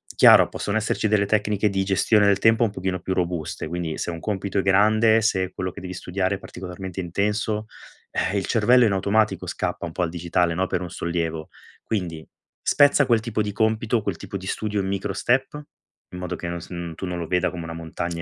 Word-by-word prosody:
chiaro, - - +7
possono 100 +1 -2
esserci 110 0 0
delle 105 -1 +2
tecniche 105 0 +1
di 95 -1 0
gestione 100 +2 +3
del 100 -1 +4
tempo 115 +2 +4
un 115 - +2
pochino 95 -2 -3
più 95 - -2
robuste. 85 -4 -2
Quindi 85 -1 -3
se - - -3
un 85 - -6
compito 100 0 -2
è - - +3
grande, 110 +3 +4
se 95 -4 +1
quello 90 0 -3
che - - -10
devi 90 0 -6
studiare 95 +2 -2
è - - -9
particolarmente 90 0 -8
intenso, 105 +4 -1 0.5
eh, 100 - -1
il 95 - -1
cervello 120 +2 +4
in 110 - +2
automatico 100 +3 +1
scappa - - -3
un 85 - -6
po' 90 - -1
al 85 - 0
digitale, 85 0 0
no, 95 +3 0
per 90 -1 -2
un 90 - -5
sollievo. 80 -2 -3 0.4
Quindi, 85 -7 -4 0.3
spezza 145 0 +4
quel 115 -2 +4
tipo 110 -1 -2
di 105 -1 -2
compito, 110 +2 +1
quel 100 -5 -2
tipo 100 - -6
di 95 - -10
studio 105 0 -1
in 95 - -3
micro 100 +1 -2
step. 130 +8 0 0.5
In 90 - -6
modo 90 -1 -4
che 85 - -6
non 85 0 -4
s - - -11
uhm, 85 -2 -5
tu 95 - -5
non 90 -1 -3
lo 85 - -3
veda 90 +1 +1
come 85 -1 -7
una 80 0 -6
montagna 85 +1 -5
95 Hz, 220 wpm, -23 LUFS, 90-105 Hz, 0.5 s, chiaro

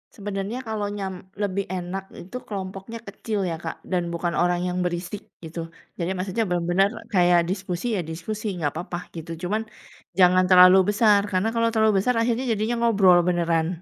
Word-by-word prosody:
Sebenernya 205 +4 -4
kalau 215 -2 -2
nyam 200 -2 -4 0.3
lebih 200 -1 -1
enak 185 +1 -4 0.2
itu 190 +8 -7
kelompoknya 195 +2 -6
kecil 210 +1 -4
ya, 165 - -2
Kak, 165 - -4 0.2
dan 175 -2 0
bukan 170 0 -2
orang 175 0 +2
yang 180 0 -2
berisik, 180 +3 -3 0.2
gitu. 165 +1 -7 0.4
Jadi, 170 0 -1
maksudnya 195 +5 -1
bener-bener 175 +2 +2 0.3
kayak 175 -2 +5
diskusi 185 +2 -3
ya - - 0
diskusi, 210 +7 -5
nggak 155 -5 -1
apa-apa, 175 0 -5 0.2
gitu. 165 0 -7
Cuman, 210 +5 0 0.6
jangan 185 0 +6
terlalu 185 0 +8 0.2
besar, 210 -2 +5
karena 185 +3 +1
kalau 230 0 +2
terlalu 220 -1 +4
besar 250 +6 +1
akhirnya 230 +2 +1
jadinya 220 +2 0
ngobrol 200 -6 +5
beneran, 170 -2 +1
190 Hz, 165 wpm, -24 LUFS, 175-210 Hz, 0.6 s, terlalu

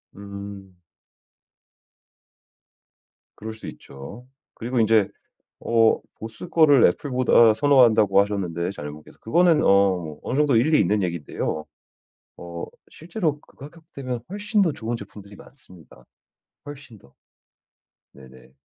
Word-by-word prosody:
음. 100 -1 -10 2.6
그럴 110 +1 -7
수 110 - -11
있죠. 70 - -11 0.3
그리고 120 +2 -3
인제 110 -2 +3 0.5
어 115 -1 +2 0.2
보스 110 +10 -9
거를 150 -6 +5
애플보다 125 -5 +3
선호한다고 110 -6 +4
하셨는데 90 -4 -2
자녀 75 -6 -7
분께서. 75 0 -15
그거는 165 +5 +3
어 95 -6 +2
어느 135 - -3
정도 145 -5 +3
일리 150 +7 +3
있는 105 0 +1
얘긴데요. 85 -2 -4 0.7
어 85 -1 -7 0.3
실제로 165 -3 -3
그 - - -25
가격대면 140 -4 -8
훨씬 205 +2 -1
더 170 -5 +1
좋은 120 -2 -4
제품들이 100 -2 -12
많습니다, 95 - -18 0.6
훨씬 145 -6 -11
더. 70 -6 -23 1.0
네네. 65 -1 -17
110 Hz, 250 characters per minute, -23 LUFS, 95-140 Hz, 2.6 s, 거를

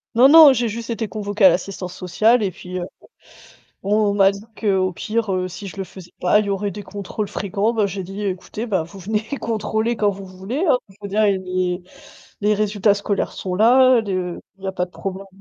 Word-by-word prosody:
Non, 245 +3 +7
non, 310 0 +9
j'ai 240 -2 +1
juste 230 +2 -6
été 230 -1 -2
convoquée 205 -1 0
à - - +10
l'assistance 180 0 -3
sociale 215 +6 +2
et 195 - 0
puis, 180 +1 -7
heu, 175 - -3 1.0
on 200 +2 +1
on 210 -1 +2
m'a 195 -1 +5
dit 200 +1 -10 0.2
qu'au 190 -4 +1
pire, 220 +3 -2
heu, 185 0 -1
si 185 +3 -9
je 190 - -10
le 195 - -2
faisais 185 -1 -13
pas, 180 +3 +4
il 215 - -1
y - - -3
aurait 200 +1 -1
des 205 +2 -8
contrôles 205 +2 -5
fréquents, 200 +3 -1
bah, 215 -3 +1
j'ai 190 0 -5
dit: 195 +3 -7
«Écoutez, 200 +4 -4
bah, 190 -7 0
vous 170 +4 -12
venez 210 +3 -2 0.2
contrôler 220 +1 -1
quand 210 -2 +2
vous 195 0 -9
voulez, 190 - -4
hein. 250 - +5
Il 195 - -18
faut 205 - -6
dire 210 +2 +1
les 185 -2 0 0.6
les 210 +1 +2
résultats 205 -1 +2
scolaires 200 0 -2
sont 185 -1 -4
là, 250 +4 +5
de 185 -4 -3 0.2
il 195 - -15
y - - -2
a 190 - -2
pas 180 -1 -2
de - - -24
problème». 195 +1 -6
200 Hz, 225 wpm, -21 LUFS, 185-215 Hz, 1.0 s, à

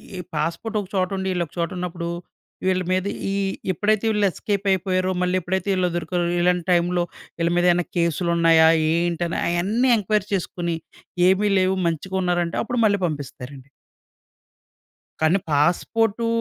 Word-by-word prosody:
ఈ - - -5 0.2
పాస్పోర్టొక 205 +6 -2
చోటుండి 190 +1 -1
ఈళ్ళోక 170 -4 -2
చోటున్నప్పుడు, 175 -1 -3 0.6
వీళ్ళ 185 -1 +2
మీద 185 0 +1 0.3
ఈ - - -1 0.4
ఎప్పుడైతే 215 +4 +1
వీళ్ళు 210 -1 +2
ఎస్కేపయిపోయారో, 190 -2 0
మళ్ళేప్పుడైతే 185 +1 -1
ఈళ్ళు 180 -1 +1
దొరికారో, 175 +1 -1 0.2
ఇలాంటి 180 -1 +1
టైమ్‌లో 175 0 +2 0.4
ఈళ్ళ 170 0 +2
మీదేన్నా 175 0 +3
కేసులున్నాయా? 170 -1 +3 0.3
ఏంటని, 170 0 -1
అయన్నీ 205 +9 +1
ఎంక్వైరీ 210 -1 0
చేసుకుని, 175 -2 -2 0.5
ఏమి 205 +2 +2
లేవు 185 +1 +1
మంచిగున్నారంటే, 175 0 -1
అప్పుడు 240 +1 -2
మళ్ళీ 200 -2 +2
పంపిస్తారండి. 140 -2 -8 1.5
కానీ 160 +5 +3
పాస్పోర్టూ 205 +9 +1
180 Hz, 115 wpm, -22 LUFS, 170-190 Hz, 1.5 s, మీదేన్నా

